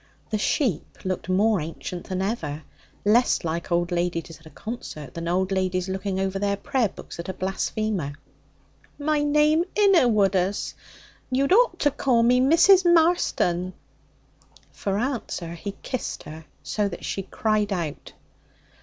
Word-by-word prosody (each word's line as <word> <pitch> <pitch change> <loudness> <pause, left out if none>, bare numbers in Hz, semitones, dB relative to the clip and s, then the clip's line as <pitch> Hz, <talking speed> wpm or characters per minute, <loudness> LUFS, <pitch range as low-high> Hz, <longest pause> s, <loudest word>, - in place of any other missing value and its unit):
The 215 - 0
sheep 215 - -1
looked 185 -1 -3
more 200 0 +3
ancient 165 +3 -6
than 185 0 -1
ever, 160 -8 -3 0.4
less 235 +4 +3
like 170 +1 -3
old 175 +1 +1
ladies 170 -2 -2
at 160 - -16
a - - -11
concert 155 - -7
than 170 0 -5
old 185 +2 0
ladies 185 -1 0
looking 190 0 -2
over 195 0 -1
their 200 0 0
prayer 235 +1 0
books - - -11
at 170 - -5
a 190 - -4
blasphemer. 190 -4 -2 0.8
'My 300 0 +1
name 300 +2 +3
inna 390 -10 +5
Woodus. 195 -3 +1 0.6
You'd 275 +6 +2
ought 470 -4 +4
to 290 - +3
call 245 -4 +2
me 250 +2 +4
Mrs. 340 +7 +6
Marston.' 320 - +2 1.0
For 200 -1 -2
answer, 225 -8 -3
he 195 +4 -6
kissed 255 -3 -4
her 155 +1 -10 0.2
so 210 -1 0
that - - -8
she 195 - -2
cried 215 +1 0
out. 170 -6 -4
200 Hz, 145 wpm, -25 LUFS, 175-255 Hz, 1.0 s, Mrs